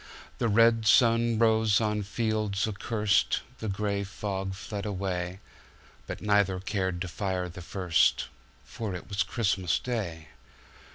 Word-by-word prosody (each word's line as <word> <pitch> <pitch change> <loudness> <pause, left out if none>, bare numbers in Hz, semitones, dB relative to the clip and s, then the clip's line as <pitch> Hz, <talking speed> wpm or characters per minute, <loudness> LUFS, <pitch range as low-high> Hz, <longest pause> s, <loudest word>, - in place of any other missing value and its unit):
The 115 - +1
red 115 +1 +4
sun 115 0 +4
rose 110 -2 +4
on 105 -1 0
fields 105 -1 -1
accurst, 105 0 +1 0.2
The 110 - -3
gray 100 0 -1
fog 95 -1 -4
fled 100 +2 -6
away; 95 -2 -3 0.7
But - - -6
neither 100 -3 +2
cared 95 -2 -2
to 95 - -2
fire 90 0 -2
the 90 +1 -9
first, 90 -1 +2 0.4
For 105 -5 -5
it 90 - -8
was 100 -1 -1
Christmas 95 -6 0
Day! 90 -10 -4
100 Hz, 130 wpm, -28 LUFS, 95-110 Hz, 0.7 s, red